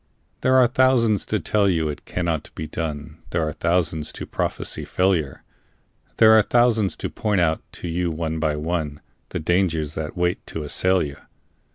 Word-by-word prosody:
There 130 0 +3
are 130 -1 +7
thousands 120 -4 +3
to - - 0
tell 105 -2 +2
you 80 -4 +1
it 75 - -6
cannot 85 -4 -2
be 80 - -4
done, 75 0 -5
There 85 -2 0
are 75 - -3
thousands 85 -3 0
to - - -6
prophesy - - -3
failure; 90 -7 0 0.7
There 110 -1 +7
are 110 - +7
thousands 115 -3 +2
to - - -4
point 105 -3 0
out 80 -2 +1
to - - -6
you 85 +1 -1
one 80 0 -3
by 75 -1 0
one, 75 -2 -3 0.3
The - - -3
dangers 80 -3 0
that 80 +2 -5
wait 90 0 0
to 80 - -4
assail 90 +5 +2
you. 70 -1 -6
85 Hz, 175 wpm, -23 LUFS, 80-95 Hz, 0.7 s, are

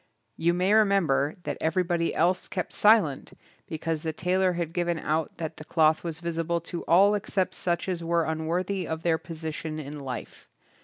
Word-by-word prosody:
You 170 +1 +1
may 185 +3 +2
remember 195 -9 +3
that - - -4
everybody 170 +1 0
else 180 +3 +1
kept 180 - -4
silent 210 -10 +3 0.3
because 160 0 -3
the 160 - -2
tailor 180 +3 +1
had 170 -2 -3
given 175 -1 0
out 155 0 -2
that 160 -1 -5
the - - -8
cloth 155 -1 +2
was 165 -1 -5
visible 170 0 -1
to 170 +1 -6
all 195 +5 +5
except 200 -2 -1
such 175 0 -1
as 175 -3 -2
were 170 0 +1
unworthy 170 +4 -2
of 160 0 -4
their 165 -2 +2
position 160 -1 -6
in 145 0 -7
life. 130 -3 -7
170 Hz, 170 wpm, -27 LUFS, 160-180 Hz, 0.3 s, all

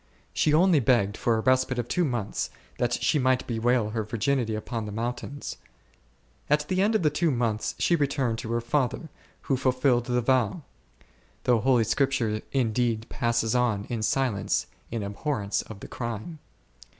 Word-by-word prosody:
She 150 - +2
only 170 +1 +5
begged 115 -5 +2
for 115 0 +1
a - - 0
respite 130 +1 +2
of 120 -1 -2
two 180 - +1
months, 120 -9 -2 0.3
that 120 0 +1
she 150 - +1
might 130 0 +2
bewail 115 -1 +1
her 110 0 -1
virginity 115 +1 0
upon 110 0 -4
the - - -5
mountains. 120 +6 -4 0.9
At 150 0 +2
the 185 0 +1
end 215 +3 +2
of 215 - +2
the 150 - +3
two 165 +3 +1
months, 115 -5 -1
she 175 - +3
returned 135 -6 0
to 115 -2 -5
her 120 - 0
father, 130 +5 -1 0.3
who 135 - 0
fulfilled 130 -1 +2
his 125 0 +1
vow; 130 - +1 0.8
though 120 -2 +3
Holy 125 0 +3
Scripture 115 -3 0
indeed 115 -3 0
passes 115 -2 0
on 120 -5 +1
in 115 -2 -2
silence, 125 -2 0 0.2
in 115 -2 -3
abhorrence 100 +1 -2
of 105 -2 -11
the - - -8
crime. 120 +7 -5
120 Hz, 165 wpm, -27 LUFS, 110-135 Hz, 0.9 s, only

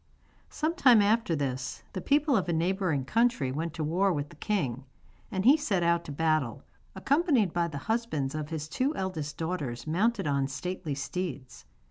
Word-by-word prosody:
Some 310 +2 -1
time 250 -9 +6
after 205 -3 +2
this 130 -3 -3
the 185 - -4
people 290 - +2
of 190 -5 0
a - - +1
neighbouring 170 -4 0
country 225 - +1
went 160 +4 -3
to 160 - -2
war 180 +6 +2
with 145 -3 -2
the 170 - -14
king, 140 - -2 0.4
and 190 -2 -2
he 270 +4 +8
set 200 - 0
out 170 0 +2
to - - -6
battle, 150 -4 0 0.3
accompanied 270 - +2
by 170 -1 +1
the 150 -4 -6
husbands 155 - -2
of 155 -1 -4
his 155 -2 -4
two 265 - -1
eldest 160 - -4
daughters 145 -8 -3
mounted 195 +5 +1
on 140 -2 +1
stately 155 +1 -4
steeds. 140 -3 -5
170 Hz, 175 wpm, -29 LUFS, 145-210 Hz, 0.4 s, he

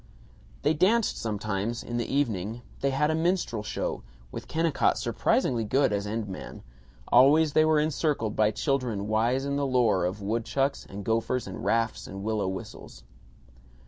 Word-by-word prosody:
They 150 - +3
danced 200 +8 +2
sometimes, 105 +1 -2
in 120 - -4
the 120 - -3
evening; 115 -4 -1 0.2
they 140 - +1
had 150 +3 +1
a - - +1
minstrel 160 - 0
show, 105 - -3 0.3
with - - -7
Kennicott 165 -2 +1
surprisingly 120 -3 +1
good 130 +2 +2
as 100 0 -2
end 110 0 -3
man; 95 - -8 0.5
always 145 +5 +5
they 155 - +5
were 155 -1 +4
encircled 150 -7 0
by 105 -1 +3
children 115 -2 -1
wise 120 +5 +1
in 140 0 -1
the 140 -1 0
lore 120 -8 +2
of 95 +4 -3
woodchucks 115 +7 -1
and 100 +1 -7
gophers 115 +2 0
and - - -7
rafts 115 0 0
and 95 +1 -7
willow 105 -2 -1
whistles. 95 -9 -7
120 Hz, 160 wpm, -27 LUFS, 105-140 Hz, 0.5 s, always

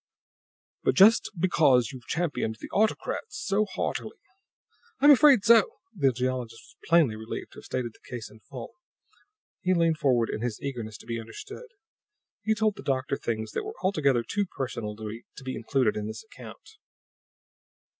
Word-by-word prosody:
"But - - +1
just 210 +4 +6
because 150 -8 +3
you've 130 -3 -11
championed 150 -10 -1
the - - -9
autocrats 220 - -1
so 200 +2 +1
heartily 205 - -4 0.4
" 475 0 -36
"I'm 290 +2 +8
afraid 280 -6 +6
so!" 230 -2 +5 0.2
The 140 -7 +3
geologist 125 -2 -3
was - - -19
plainly 165 -10 +5
relieved 110 +1 -7
to - - -12
have - - -14
stated 120 -3 -3
the - - -20
case 120 -3 -6
in 110 - -16
full. 125 - -9 0.9
He 185 0 +2
leaned 165 -2 +2
forward 120 -5 +2
in - - -4
his 120 -3 -3
eagerness 120 -6 -5
to - - -16
be 115 0 -3
understood. 115 - -9 0.7
He 220 0 +1
told 215 -2 +1
the - - -7
doctor 135 0 -1
things 110 -4 -3
that - - -3
were - - -7
altogether 140 -10 +2
too 205 - -1
personal 120 -8 -4
to 110 +5 -9
be 130 0 -4
included 120 -1 +1
in 105 0 -3
this 110 - -7
account. 440 - -13
135 Hz, 165 wpm, -27 LUFS, -, 0.9 s, I'm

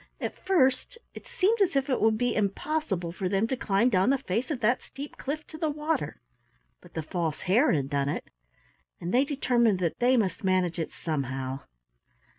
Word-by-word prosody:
At - - -5
first 290 - +2 0.2
it - - -11
seemed 415 +4 +1
as 370 -6 +3
if 275 0 +2
it 260 - 0
would 220 0 +4
be 245 +2 +1
impossible 200 - -1
for 185 +1 -3
them 195 +3 +2
to 260 - -1
climb 220 0 +2
down 190 0 +3
the 275 - +4
face 235 0 -2
of 295 -6 -2
that 235 +3 +2
steep 280 +2 -9
cliff 305 +3 -4
to 315 - -11
the 320 -2 +1
water, 300 - -2 0.6
but - - -18
the 160 - -2
False 160 -1 -2
Hare 230 +11 +3
had 140 -5 +1
done 140 0 +1
it, - - -4 0.7
and 175 +1 -4
they 255 +2 +5
determined 240 -7 +2
that 175 -3 -2
they 250 +1 +4
must 195 -5 0
manage 185 -2 +1
it 160 - -3
somehow. 135 -4 -3
225 Hz, 195 wpm, -28 LUFS, 180-275 Hz, 0.7 s, they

